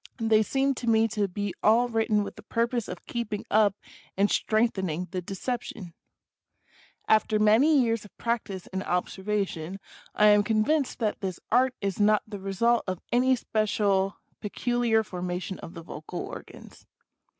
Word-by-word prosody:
They 225 -2 +3
seem 270 +5 +1
to 235 - -1
me 225 0 +4
to 210 -2 0
be 200 +1 -4
all 230 +3 +4
written 220 -3 +1
with - - -7
the - - -11
purpose 235 0 -1
of 180 - -8
keeping 220 -4 -4
up 210 -2 +4 0.4
and 200 +1 +3
strengthen 215 -4 +1
ing 170 +4 -3
the 185 - -3
deception. 195 -1 -5 1.1
After 215 0 +3
many 230 +9 +5
years 230 -3 +1
of 210 - -16
practice 215 -6 -3
and 190 - -1
observation 190 -1 -2 0.4
I 210 0 +6
am 205 0 +6
convinced 230 +7 +1
that 215 -3 -2
this 185 -3 -4
Art 255 +2 +3
is 195 -1 -2
not 210 0 +4
the 210 -2 -7
result 215 +5 +1
of 185 -2 -2
any 255 +2 +4
special 205 -4 0 0.2
pecu 240 +3 -2
liar 225 -2 +3
formation 180 -1 -4
of 170 - -10
the 165 - -8
vocal 160 +2 -7
organs. - - -10
210 Hz, 160 wpm, -27 LUFS, 195-230 Hz, 1.1 s, I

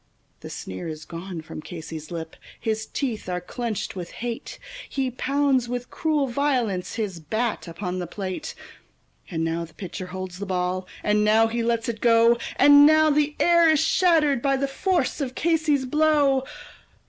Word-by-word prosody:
The - - -9
sneer 95 - -6
is 155 -1 -7
gone 170 0 -7
from 155 - -9
Casey's 160 -1 -8
lip, 165 -2 -6 0.2
his 220 0 -2
teeth 235 -9 -3
are 180 0 -1
clenched 230 +1 -4
with 175 -2 -7
hate; 235 -1 -5 0.3
He 265 -2 -1
pounds 265 -1 +1
with 245 0 -4
cruel 305 -3 +1
violence 245 -8 -1
his 205 -6 -3
bat 220 +7 -2
upon 180 +2 -4
the 175 - -4
plate; 195 - -5 0.7
And 165 -4 -2
now 165 +1 -1
the 165 -1 -12
pitcher 185 -1 -6
holds 185 0 -6
the 200 - -5
ball, 185 0 -1 0.2
and 210 0 +2
now 220 +1 +5
he 230 +1 -1
lets 230 0 0
it 230 -2 -4
go, 230 0 +5 0.2
And 285 +1 +8
now 310 0 +5
the 300 0 +1
air 340 -1 +5
is 310 -2 +4
shattered 320 -5 +3
by 275 0 +2
the 275 +1 0
force 345 +3 0
of 255 -2 -3
Casey's 315 -5 +1
blow. 290 -2 +3
235 Hz, 170 wpm, -24 LUFS, 185-280 Hz, 0.7 s, And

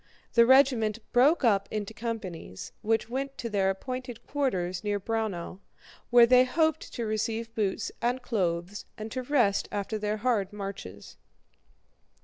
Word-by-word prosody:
The 235 0 +6
regiment 255 -5 +4
broke 275 +6 +4
up 200 -5 +3
into 215 0 -4
companies, 215 - -6
which 225 +1 +1
went 270 +3 -4
to 230 - -5
their 195 -2 +2
appointed 245 +3 -5
quarters 185 -10 -1
near 205 -1 0
Braunau, 200 -4 -3 0.5
where 240 -1 +8
they 250 +1 +6
hoped 315 +4 0
to 235 - -3
receive 225 +1 -2
boots 205 -4 -1
and 245 +2 +1
clothes 190 -5 -2
and 215 0 -6
to 255 - -3
rest 245 -7 +2
after 205 +1 -3
their 210 0 -1
hard 215 -4 0
marches. 195 - -8
220 Hz, 140 wpm, -28 LUFS, 200-250 Hz, 0.5 s, where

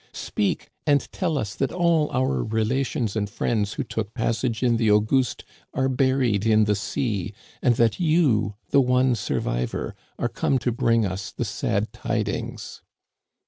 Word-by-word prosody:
Speak; 205 -5 -2 0.2
and 145 -1 +5
tell 165 -5 -1
us 105 -6 -2
that 135 - -1
all 170 -4 +2
our 95 - 0
relations 115 - -1
and 105 -2 -1
friends 105 0 -1
who 140 - -2
took 110 -3 -4
passage 115 0 -1
in 120 -2 +3
the 115 -2 +2
Auguste 110 +4 +2 0.3
are 130 - +2
buried 130 -5 +2
in 110 -1 +4
the 105 0 +2
sea^ 105 -1 -2 0.3
and 120 -2 +3
that 115 -1 +2
you, 145 - +2 0.2
the 140 - +6
one 125 0 +3
survivor, 60 - -2 0.2
are - - 0
come 135 - 0
to 125 0 -1
bring 115 -1 +2
us 95 -1 -4
the - - -3
sad - - -1
tid - - -2
ings - - -5
115 Hz, 160 wpm, -24 LUFS, 105-135 Hz, 0.3 s, the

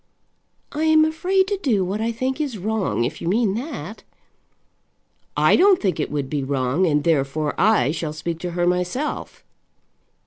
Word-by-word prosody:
"I 305 +2 -1
am 315 0 +5
afraid 370 +5 +1
to 405 - 0
do 220 - +1
what 200 +4 -3
I 230 +1 0
think 260 +5 -2
is 275 -7 -3
wrong, 205 - -1
if 135 +6 -4
you - - -4
mean 205 +2 +2
that." 225 - -6 1.4
"I - - +5
don't 390 0 +5
think 190 -5 -1
it 150 - -1
would 145 -2 -2
be 145 0 -2
wrong, 135 +6 0
and 150 -2 +1
therefore 150 -1 0
I 195 - +3
shall 160 -1 -3
speak 160 +2 -5
to 175 +1 -4
her 175 - +2
myself." 180 +11 -2
190 Hz, 170 wpm, -22 LUFS, -, 1.4 s, am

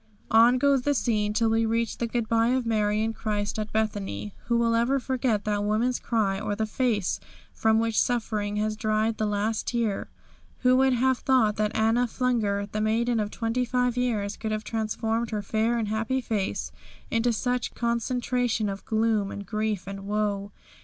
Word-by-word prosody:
On 230 +3 +6
goes 280 0 +3
the 285 +3 +1
scene 215 -4 +1
till 220 +1 +2
we 225 0 +2
reach 225 0 -1
the 235 - 0
goodby 230 -1 +1
of 255 -2 -1
Mary 215 -1 +1
and 225 0 -1
Christ 210 -1 -2
at 215 0 -4
Bethany. 200 - -2
Who 235 0 +1
will 230 0 +2
ever 240 +4 +2
forget 250 -5 -1
that 205 -1 0
woman's 225 +4 +1
cry, 205 -4 0
or 205 0 -2
the 220 - -1
face 215 -3 0 0.3
from 220 0 +2
which 225 -1 +2
suffering 215 -4 -1
has 215 +1 0
dried 215 +1 0
the 215 - +1
last 210 +2 -1
tear? 230 -4 -1 0.5
Who 255 0 +5
would 265 0 +4
have 255 +1 +2
thought 250 -6 +3
that 210 0 0
Anna 225 +3 +2
Flunger, 220 -5 0
the 215 - -2
maiden 230 +2 +1
of 210 -1 -1
twenty 230 +3 -1
five 250 0 0
years, 215 -5 -1
could 220 - -4
have 215 0 -2
transformed 225 +1 -2
her 210 -2 -3
fair 220 +3 +1
and 225 -2 -1
happy 220 +5 -1
face 190 - -2 0.4
into 230 +1 +2
such 245 +2 -1
concentration 235 -1 0
of 195 0 -6
gloom 220 -2 +1
and 200 - -6
grief 215 -1 -2
and 195 0 -7
woe? 205 -1 -1
220 Hz, 180 wpm, -26 LUFS, 210-235 Hz, 0.5 s, On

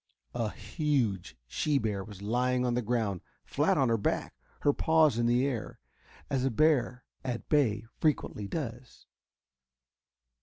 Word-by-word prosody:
A 115 -3 -1
huge 110 - -1
she 145 - 0
bear 105 -5 -1
was 100 -1 -11
lying 125 +3 +1
on 120 - +1
the 125 - +1
ground, 110 -5 -1 0.2
flat - - +1
on 135 -3 +3
her 115 -1 +2
back, - - -1 0.3
her 145 - +3
paws 155 -7 +3
in 120 - +2
the 120 +2 +3
air, 125 -6 -3 0.5
as 135 -2 0
a 135 - +2
bear 125 -2 +2 0.2
at 125 -3 -4
bay 120 -8 +2
frequently 140 -9 0
does. 125 -3 -6
120 Hz, 145 wpm, -30 LUFS, 110-135 Hz, 0.5 s, on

